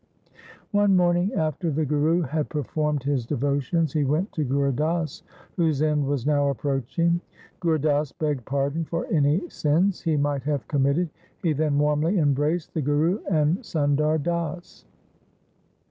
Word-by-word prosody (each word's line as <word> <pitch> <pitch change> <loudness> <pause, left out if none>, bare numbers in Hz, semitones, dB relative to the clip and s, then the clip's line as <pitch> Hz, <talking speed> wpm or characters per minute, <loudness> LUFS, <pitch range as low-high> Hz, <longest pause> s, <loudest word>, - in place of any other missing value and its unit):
One 205 -2 +4
morning 175 +2 +2
after 160 +2 -1
the 155 +1 0
Guru 150 +4 +2
had 155 0 -2
performed 150 -1 -1
his 140 -3 0
devotions 140 +5 0
he 150 - +1
went 155 +9 0
to 155 - -2
Gur 140 +1 +1
Das, 155 +2 -1 0.4
whose 155 -4 +1
end 150 -2 +1
was 140 -3 -1
now 145 -1 +2
approaching. 140 +6 0 0.4
Gur 165 -3 +1
Das 150 -1 0
begged 150 -5 -2
pardon 140 +5 -1
for 165 +1 -3
any 155 +4 +2
sins 170 +7 +1
he 160 -3 0
might 145 -1 0
have 145 0 -2
committed. 145 +4 +1 0.3
He 165 -3 +2
then 150 -1 0
warmly 150 +6 +2
embraced 150 +2 +1
the 160 - -1
Guru 150 +7 +1
and 160 +1 +2
Sundar 150 - +1
Das. 170 +2 -4
150 Hz, 145 wpm, -25 LUFS, 145-165 Hz, 0.4 s, One